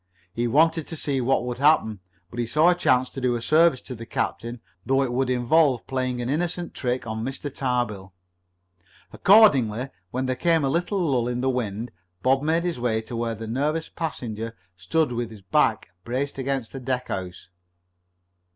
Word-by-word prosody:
He 120 +3 -1
wanted 160 +5 +3
to 165 - -6
see 140 -3 0
what 125 0 +1
would 125 0 -4
happen. 135 -8 +3 0.3
But 120 - -7
he 120 - -1
saw 155 +8 +4
a - - +5
chance 130 -7 +2
to 135 - -6
do 125 -1 +1
a - - -2
service 155 -3 +4
to 130 - -8
the 115 -1 -9
captain, 120 +1 -3 0.2
though 135 +1 +2
it 125 -2 -2
would 130 +1 0
involve 130 +2 +3
playing 130 -2 -2
an - - -3
innocent 170 +5 -2
trick 125 -2 -2
on 110 0 -4
Mr. 135 +2 -5
Tarbill. 120 -8 -2 1.0
Accordingly, 135 - +5 0.2
when 130 +5 -2
there 130 0 -1
came 165 +3 +2
a - - +1
little 175 +7 0
lull 135 -9 +1
in 125 0 -2
the 130 0 +1
wind, 115 -2 -3 0.3
Bob 135 +1 +3
made 160 +3 +1
his 175 -7 -2
way 120 -2 0
to 110 +2 -8
where 115 0 -2
the 115 +1 -7
nervous 150 +8 -1
passenger 115 -8 -5 0.2
stood 160 - 0
with 120 -1 -3
his 105 -3 -13
back 95 - +1
braced 135 +5 -3
against 135 -3 -2
a 135 - -5
deckhouse. 95 -9 -4
130 Hz, 185 wpm, -24 LUFS, 120-145 Hz, 1.0 s, a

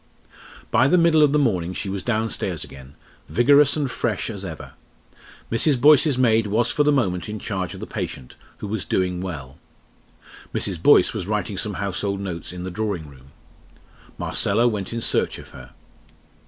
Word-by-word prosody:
By - - +4
the 180 - +4
middle 165 -2 +4
of 150 -2 +5
the 150 - +3
morning 95 - 0
she 100 - -4
was 95 0 -3
downstairs 110 +1 -2
again, 70 +1 -13 0.3
vigorous 140 +4 +5
and 150 - 0
fresh 115 -1 -2
as 100 -3 -7
ever. 80 -5 -8 0.8
Mrs. 130 +4 +2
Boyce's 145 0 +5
maid 115 -3 +3
was 115 +4 +1
for 145 +3 +2
the 150 - +3
moment 95 - 0
in 105 - -4
charge 95 -5 -4
of - - -9
the - - -4
patient, 65 - -6 0.2
who - - -6
was 105 -1 -2
doing 90 -1 -1
well. 75 -8 -7 1.0
Mrs. - - -2
Boyce - - +5
was 90 - -4
writing 105 0 -2
some 105 0 -3
household 100 +1 -2
notes 90 -5 -5
in 90 0 -7
the 95 - -5
drawing 90 -6 -3
room. 65 -1 -17 0.9
Marcella 115 +5 +1
went 105 -5 -2
in 115 0 -3
search - - 0
of - - -12
her. 65 0 -12
105 Hz, 175 wpm, -23 LUFS, 90-120 Hz, 1.0 s, of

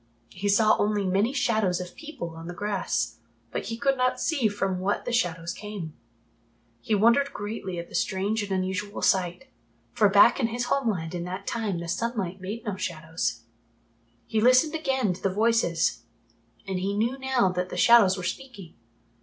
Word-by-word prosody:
He 205 - -3
saw 215 +2 +5
only 205 -1 +1
many 195 +6 +2
shadows 220 -9 +1
of 180 -1 -7
people 305 - -7
on 165 +1 -9
the 175 - -6
grass, 190 - -2 0.3
but - - -3
he 230 +3 -4
could 270 +3 +2
not 255 0 +1
see 280 -9 +1
from 195 -3 -2
what 195 +2 -1
the - - -2
shadows 170 -7 0
came. 200 -7 -7 0.9
He 215 - 0
wondered 235 +7 +4
greatly 205 -3 -5
at 170 0 -5
the - - -17
strange 200 +4 0
and 205 -1 -5
unusual 190 +2 -2
sight, 180 -2 +1 0.5
for 210 - +4
back 205 +6 +6
in 240 - +2
his 240 +1 -2
homeland 205 -12 -1
in 175 -1 -3
that 185 +2 -6
time 220 -6 -2
the 170 0 -5
sunlight 195 -2 -2
made 210 +5 -6
no 205 -3 -3
shadows. 160 -8 -3 0.8
He 220 - 0
listened 255 +6 +5
again 265 - 0
to 175 - -11
the 195 - +1
voices 210 - +1 0.6
and 190 -2 -2
he 200 +2 -2
knew 240 +5 0
now 265 -6 +2
that 180 0 -2
the - - -6
shadows 215 -5 +6
were 185 - -5
speaking. 200 -5 -6
205 Hz, 180 wpm, -26 LUFS, 180-230 Hz, 0.9 s, back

